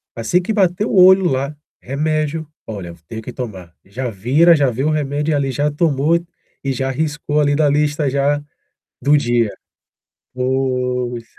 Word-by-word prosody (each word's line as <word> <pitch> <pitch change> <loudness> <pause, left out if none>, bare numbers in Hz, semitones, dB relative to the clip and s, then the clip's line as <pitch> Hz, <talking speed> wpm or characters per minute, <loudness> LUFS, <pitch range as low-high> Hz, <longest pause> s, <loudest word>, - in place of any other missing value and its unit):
assim 115 +11 +1
que 215 +5 -2
bater 190 0 +1
o - - -3
olho 185 +1 +7
lá, 140 -1 -1 0.3
remédio. 155 +3 -2 0.2
"Olha, 100 -6 -6
eu 85 - -11
tenho 110 0 -6
que 125 - -8
tomar". 95 -9 -7
Já 120 +6 -4
vira 135 - +4
já 140 -3 +2
vê 125 +2 -3
o 155 - +2
remédio 150 0 0
ali, 140 -1 0
já 145 +3 0
tomou 150 +1 +2 0.5
e 135 - -1
já 135 +1 -2
riscou 150 +1 -1
ali 145 -1 +2
da 150 -1 +3
lista, 150 0 +1
já, 140 +2 +1 0.6
do 145 +3 +4
dia. 120 -5 +1 0.8
Pois. 125 -2 -1
140 Hz, 165 wpm, -18 LUFS, 125-155 Hz, 0.8 s, olho